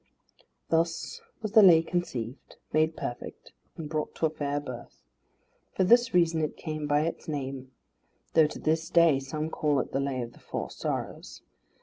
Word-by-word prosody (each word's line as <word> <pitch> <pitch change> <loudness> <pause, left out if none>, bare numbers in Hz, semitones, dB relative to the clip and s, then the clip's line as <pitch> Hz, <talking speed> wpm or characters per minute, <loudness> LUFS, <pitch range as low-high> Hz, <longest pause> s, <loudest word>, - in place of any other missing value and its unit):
Thus 165 0 0 0.2
was 215 - -2
the 220 0 +8
Lay 170 -5 +8
conceived, 130 -9 -4 0.2
made 155 +1 +2
perfect, 120 - -6 0.3
and 160 - -5
brought 155 0 -3
to - - 0
a 155 - +1
fair 145 -2 -2
birth. 125 -4 -9 0.7
For 190 - +2
this 235 +5 +5
reason 170 -3 +3
it 155 - -2
came 155 -2 -4
by 145 0 +3
its 165 +2 -3
name; 135 -3 -4 0.6
though 160 -2 +6
to - - -8
this 160 +1 0
day 170 -5 +5
some 150 +4 -4
call 150 -2 +1
it - - -3
the 135 - 0
Lay 135 -2 -1
of 120 0 -9
the - - -18
Four - - -5
Sorrows. - - -5
155 Hz, 175 wpm, -28 LUFS, 140-165 Hz, 0.7 s, the